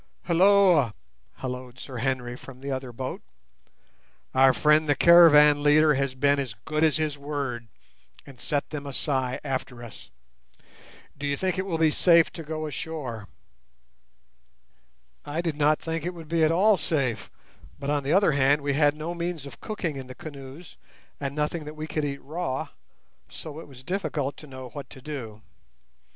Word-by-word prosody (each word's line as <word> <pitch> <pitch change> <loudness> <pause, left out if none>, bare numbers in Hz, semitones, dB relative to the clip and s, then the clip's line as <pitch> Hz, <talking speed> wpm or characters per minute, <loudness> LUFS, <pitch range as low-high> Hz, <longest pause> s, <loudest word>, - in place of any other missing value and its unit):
"Hulloa!" 180 - +4 0.4
holloaed 125 -1 -6
Sir 130 -1 -8
Henry 125 0 -2
from 130 0 -12
the 140 0 -4
other 130 -1 -4
boat; 130 +2 -5 1.1
"our 130 0 +6
friend 150 +5 +3
the 145 - +4
caravan 150 -3 +7
leader 150 +1 +5
has 135 -1 -1
been 140 +2 +2
as 130 -6 -4
good 155 0 0
as 155 -1 +3
his 155 -2 -2
word, 140 -5 -4 0.6
and 135 -3 -14
set 145 -2 -2
the 150 -2 -4
Masai 135 -2 -2
after 130 -3 -4
us. 115 - -12 1.1
Do 145 0 -4
you 140 0 0
think 185 +2 -1
it 190 - -2
will 170 -4 -1
be 160 -1 +3
safe 170 +1 +5
to 165 - -8
go 155 0 -4
ashore?" 135 -7 -5 2.0
I 145 +2 -4
did 165 -3 -1
not 150 +1 +3
think 165 -1 -4
it 180 +1 -4
would 165 -2 -10
be 165 -1 +2
at 155 - +4
all 200 +5 +4
safe; 135 -9 -1 0.5
but, 140 +1 -3
on 145 -1 +1
the 140 +1 -2
other 195 -2 +4
hand, 140 +1 +3
we 140 0 0
had 145 +1 +3
no 155 +3 -4
means 170 -3 -4
of 140 - -11
cooking 180 -9 -4
in 130 -1 -7
the 130 - -10
canoes, 145 +1 -10 0.4
and 140 -1 -4
nothing 150 +2 -1
that 150 +1 -8
we 155 0 -5
could 155 -1 -2
eat 140 -1 -5
raw, 150 -3 -3 0.6
so 155 -1 -8
it - - -10
was 130 -2 -14
difficult 145 -5 -2
to 150 - -12
know 130 -2 -9
what 140 -1 -9
to - - -12
do. 125 -7 -7
145 Hz, 175 wpm, -26 LUFS, 130-160 Hz, 2.0 s, caravan